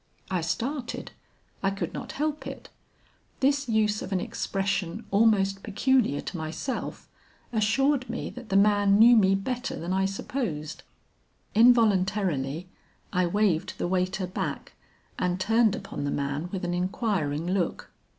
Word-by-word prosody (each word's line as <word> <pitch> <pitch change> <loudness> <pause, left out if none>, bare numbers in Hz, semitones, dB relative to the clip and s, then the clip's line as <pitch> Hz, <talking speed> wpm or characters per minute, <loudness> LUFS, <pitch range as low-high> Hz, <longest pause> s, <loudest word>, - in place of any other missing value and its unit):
"I 185 -2 +1
started. 235 - -3 0.5
I 195 - +2
could 195 0 -4
not - - -6
help 305 +1 -2
it; - - -8 0.7
this 280 0 +2
use 215 -1 +2
of - - -6
an 190 - +1
expression 195 +1 -2
almost 195 -2 +3
peculiar 215 - +1
to 180 - -6
myself, 160 - -4 0.5
assured 255 +5 +2
me 235 - -4
that 250 -3 -10
the 195 - 0
man 205 0 +5
knew 235 +3 +8
me 195 -3 +5
better 250 +6 -3
than 175 +3 -3
I 190 0 +2
supposed. 190 - -3 0.7
Involuntarily 190 - +3 0.5
I 180 -1 +2
waved 190 -3 +1
the - - -1
waiter 185 +1 0
back 180 - -4 0.5
and 180 0 0
turned 225 +2 +3
upon 145 - -6
the 145 - -1
man 140 +4 -2
with 185 -2 -3
an 175 - -1
inquiring 180 -5 -1
look. 180 -1 -2
195 Hz, 140 wpm, -27 LUFS, 180-225 Hz, 0.7 s, knew